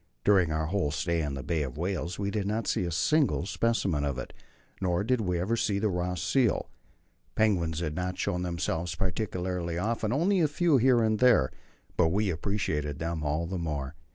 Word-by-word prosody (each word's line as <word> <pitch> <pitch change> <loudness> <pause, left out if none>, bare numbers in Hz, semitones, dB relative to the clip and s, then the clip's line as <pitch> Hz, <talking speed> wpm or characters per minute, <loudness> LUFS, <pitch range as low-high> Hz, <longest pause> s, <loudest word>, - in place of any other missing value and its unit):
During 95 -5 +4
our 80 0 0
whole 85 -2 0
stay 80 +3 -1
in 70 -3 -2
the 65 - -5
Bay 85 -3 -1
of 65 -2 -4
Whales 90 0 -2
we 100 0 -2
did 100 -2 -1
not 110 +1 -1
see 90 - 0
a 85 - -2
single 110 - +2
specimen 100 -8 0
of 70 -3 -1
it. 65 - -6 0.5
Nor 90 0 +1
did 125 +1 +1
we 90 -4 0
ever 100 +7 0
see 105 -3 0
the 105 +1 +1
Ross 90 0 -2
seal. 120 +4 +1 0.6
Penguins 85 -7 +1
had 75 -3 -2
not 90 +2 -3
shown 90 - -1
themselves 85 -1 -2
particularly 90 -1 -2
often, 110 +3 -1
only 180 +9 +2
a 160 - +4
few 155 0 +3
here 125 -1 +4
and 110 -1 +1
there; 120 - +5 0.5
but 80 - +4
we 100 +3 +1
appreciated 80 -5 -2
them 80 0 -3
all 75 +3 0
the 90 +2 -3
more. 75 -4 -3
90 Hz, 195 wpm, -29 LUFS, 80-110 Hz, 0.6 s, there